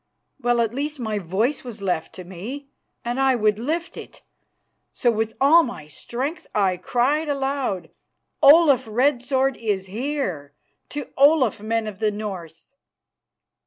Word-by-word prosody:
Well, 240 -1 +2
at 230 -1 0
least 295 +3 -3
my 220 -3 -2
voice 205 - -1
was 235 -4 -8
left 180 -5 -2
to 185 - -8
me, 220 +11 -8 0.4
and 240 +2 -2
I 265 -1 +4
would 215 -2 +1
lift 325 +8 -3
it. - - -11 0.7
So 240 - +2
with 225 0 -2
all 305 +5 +7
my 240 - -6
strength 260 - -5
I 190 -3 +2
cried 270 - 0
aloud, 270 - -2 0.5
"Olaf 285 -3 +7
Red 250 +3 +2
Sword 265 0 0
is 205 -4 -2
here! 195 - -3 0.4
To 290 -2 -6
Olaf, 275 -6 +4
men 225 +1 -1
of 210 -2 -7
the 215 -1 +2
North!" 195 - -7
240 Hz, 145 wpm, -23 LUFS, 205-275 Hz, 0.7 s, all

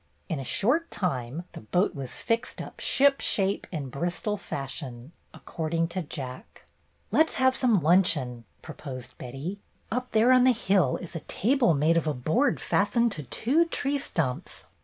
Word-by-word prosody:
In 160 - -2
a - - -4
short 265 - +1
time 140 -3 -2
the - - -9
boat 180 - +1
was 135 -5 -6
fixed 230 0 -2
up - - -8
"ship 275 0 +3
shape 195 0 0
and 145 -7 -4
Bristol 175 - -1
fashion," 135 -6 -6 0.2
according 165 0 -2
to 185 +2 -3
Jack. 130 -5 -8 0.5
"Let 315 +1 +4
's - - -8
have 260 0 +3
some 235 -7 +3
luncheon," 150 -8 +3 0.2
proposed 135 -5 -8
Betty. 135 +11 -6 0.3
"Up 250 +2 -2
there 225 +3 +4
on 255 -1 +6
the 255 0 +6
hill 190 - +2
is 180 -1 -9
a - - -2
table 235 - +2
made 155 +4 +3
of 165 - 0
a 150 - 0
board 160 - +1
fastened 235 -1 +2
to 155 - -4
two 260 - +1
tree 285 -3 -1
stumps. 145 - -3
175 Hz, 165 wpm, -27 LUFS, -, 0.5 s, on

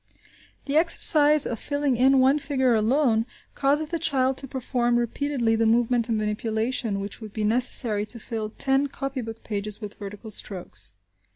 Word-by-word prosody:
The 285 +1 0
exercise 305 -2 +5
of 230 - -4
filling 285 -2 -1
in 265 +3 +4
one 265 +3 +3
figure 265 -4 0
alone, 225 +1 +1 0.3
causes 290 +2 0
the 335 - -3
child 265 -4 +1
to 270 - -3
perform 245 -2 -1
repeatedly 240 -1 -1
the 225 0 +1
movement 235 +1 +1
of 225 - +1
manipulation 220 +1 -2
which 200 +3 -7
would 215 -2 -9
be 215 - -3
necessary 220 -2 +3
to 235 - +3
fill 220 -1 -5
ten 270 +5 0
copy 275 -1 -5
book 225 -1 -9
pages 210 -1 -5
with 210 -2 -8
vertical 205 +2 -9
strokes. 140 - -4
240 Hz, 165 wpm, -24 LUFS, 215-275 Hz, 0.3 s, exercise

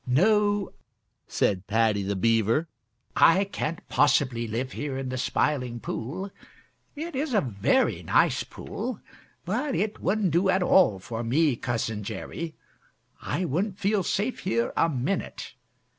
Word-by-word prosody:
"No," 205 - +2 0.5
said 95 -1 0
Paddy 110 -1 +2
the 100 +1 -2
Beaver, 115 - +2 0.5
"I 185 +4 +6
can't 170 -4 -4
possibly 130 -4 +2
live 120 +4 -3
here 140 -1 -4
in 135 -1 -4
the 130 - -3
Smiling 125 -3 0
Pool. 175 - -5 0.6
It 320 +2 -5
is 270 -2 -1
a 205 - +4
very 125 - +1
nice - - +2
pool, 250 -4 -6 0.5
but 250 - -1
it 210 +1 -1
wouldn't 195 -1 +1
do 175 +5 +2
at 190 0 +3
all 175 - +5
for 115 +5 -5
me, 140 +4 +2
Cousin 110 -3 -2
Jerry. 160 +10 -6 0.7
I 185 - -2
wouldn't 185 +6 -1
feel 200 0 +1
safe 210 +7 -1
here 115 +1 -1
a 165 - +3
minute. 140 +7 -3
150 Hz, 140 wpm, -26 LUFS, -, 0.7 s, I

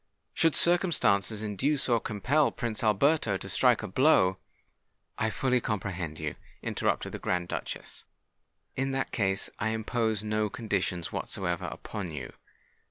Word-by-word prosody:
"Should 165 -2 +3
circumstances 115 - +3
induce 135 +8 +1
or 120 -2 +3
compel 130 +9 +1
Prince 120 -1 -3
Alberto 110 0 +3
to - - -7
strike - - +3
a - - -3
blow——" 95 -5 +4 0.8
"I 110 - +2
fully 125 +2 +1
comprehend 95 -7 -3
you," 75 -1 -4 0.3
interrupted - - -1
the - - -6
Grand 90 -1 -1
Duchess. - - -5 0.7
"In 135 0 -1
that 135 0 -1
case, 95 -3 -1
I 110 - 0
impose 110 -1 -1
no 105 0 0
conditions 100 - -2
whatsoever 90 -3 -2
upon 100 -5 -5
you. 75 -4 -7
110 Hz, 135 wpm, -29 LUFS, 95-130 Hz, 0.8 s, blow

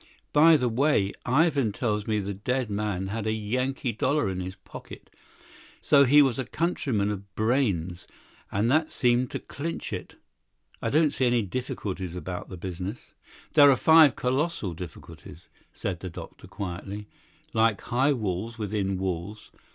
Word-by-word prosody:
By 160 +2 +7
the 125 -3 0
way, 120 -4 +2
Ivan 140 -3 +3
tells 105 -2 -1
me 110 -1 +1
the 100 0 -3
dead 120 +4 -2
man 100 -2 -2
had 110 +1 -3
a - - +2
Yankee 125 +4 -1
dollar 140 +2 0
in 90 - -4
his 95 +1 -5
pocket. - - -12 0.7
So 140 -1 +5
he 145 +3 +7
was 135 -3 0
a 130 - -1
countryman 125 - -1
of 100 -1 -8
Brayne's, 100 -8 0 0.4
and 105 +5 +1
that 155 +2 +3
seems 125 0 +1
to - - -4
clinch 165 +4 -5
it. - - -6 0.7
I - - -1
don't 155 0 +3
see 130 - +1
any 120 -2 +2
difficulties 95 -5 -4
about 90 0 -6
the 95 - -7
business." 95 +5 -6 0.4
"There 145 -2 +8
are 135 - +6
five 160 0 +6
colossal 130 - -1
difficulties," 85 -1 -11 0.2
said 90 -3 -4
the 90 - -6
doctor 85 - -10
quietly; 100 +2 -6 0.5
"like 110 -2 +3
high 130 +4 +2
walls 110 -1 -3
within 100 -3 -2
walls. 95 +3 -4
110 Hz, 155 wpm, -27 LUFS, 95-130 Hz, 0.7 s, There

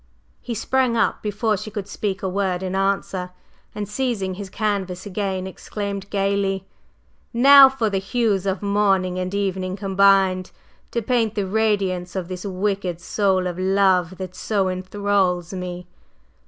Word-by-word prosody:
He 240 - -4
sprang 255 +1 +1
up 225 - +1
before 210 +1 0
she 215 - -6
could 205 -2 -5
speak 200 -2 -3
a - - 0
word 190 -1 -1
in 185 0 -3
answer, 195 -1 -1 0.5
and 210 -1 -3
seizing 210 -4 -2
his 195 +1 -7
canvas 190 -3 -2
again, 195 -2 -2
exclaimed 200 +1 -5
gayly: 195 -1 0 0.7
"Now 275 +2 +9
for 260 -4 -1
the 195 -2 0
hues 200 -1 0
of 190 +1 -1
morning 195 -3 +1
and 185 0 -3
evening 190 -2 -1
combined, 195 -2 +3 0.4
to 235 - -2
paint 225 -2 +1
the 205 -2 0
radiance 195 -3 0
of 185 -2 -3
this 185 -1 -5
wicked 190 -2 -2
soul 190 0 +1
of 180 0 -3
love 185 -2 +2
that 185 -1 -6
so 195 -2 0
enthralls 185 -1 0
me! 180 -1 -5
195 Hz, 150 wpm, -22 LUFS, 185-205 Hz, 0.7 s, Now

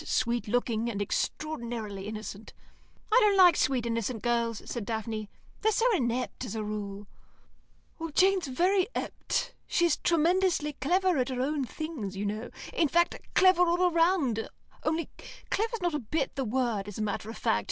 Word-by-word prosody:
Sweet 235 0 0
looking, 235 0 0
and 205 -4 -3
extraordinarily 225 -4 -3
innocent." 215 0 -7 0.6
"I 470 - +7
don't 410 -2 +4
like 355 -4 +8
sweet 255 -3 +1
innocent 230 -1 -2
girls," 235 -2 0
said 235 - -4
Daphne. 220 -1 -4 0.3
"They're 440 - +3
so 455 - +1
inept, 250 -4 -1
as 225 -3 -5
a 220 - -2
rule." 205 -1 -5 0.9
"Well, 330 0 -4
Jane's 375 +1 +3
very 360 +8 +2
ept. - - -2
She's 340 -3 +2
tremendously 335 -2 +2
clever 360 +2 +2
at 250 +1 0
her 255 -1 -3
own 285 0 0
things, 245 - -5
you 205 - -2
know; 215 +3 -3 0.2
in 325 - +3
fact, 345 +4 +3 0.2
clever 370 -1 +6
all 355 +1 +3
round, 330 - +2 0.3
only 320 +1 0 0.4
clever's 450 -1 -1
not 350 -2 +1
a 300 - 0
bit 275 +4 -2
the 270 -2 -1
word 230 -4 -1
as 205 - -7
a 215 - -1
matter 210 0 -3
of 225 - -7
fact. 105 - +2
255 Hz, 165 wpm, -29 LUFS, 220-345 Hz, 0.9 s, like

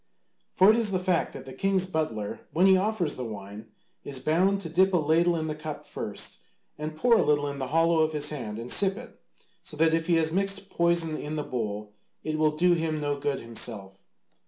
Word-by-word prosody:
For 190 +3 +6
it 220 - +2
is 230 -3 +1
the 190 - 0
fact 180 -2 0
that - - -9
the 130 - -9
king's 190 +6 +1
butler 155 - -3
when 175 +4 +3
he 190 0 +7
offers 190 -4 0
the 130 - -4
wine 105 -1 -8 0.4
is 135 -2 -4
bound 180 +8 +2
to 165 - -6
dip 185 +3 +3
a - - +5
ladle 165 +2 +2
in 160 -1 -2
the 155 - -2
cup 155 0 -7
first, - - -5 0.4
and 155 +1 -5
pour 230 +7 +4
a - - +3
little 145 -1 +2
in 140 0 -5
the 130 - -3
hollow 165 +3 +2
of 155 0 +2
his 150 0 0
hand 115 -8 -5
and 115 +2 -6
sip 195 0 +3
it, 245 - -12 0.4
so 150 - -9
that 160 +1 +3
if 165 +1 0
he 175 - +3
has 160 -1 +1
mixed 195 +2 -1
poison 170 -2 +1
in 150 +1 -5
the 150 - -2
bowl 105 -5 -4 0.3
it 155 0 -2
will 155 -1 +2
do 175 +2 +4
him 160 -2 -1
no 145 -1 -2
good 140 -1 -2
himself. 105 -4 -3
155 Hz, 225 wpm, -27 LUFS, 140-180 Hz, 0.4 s, he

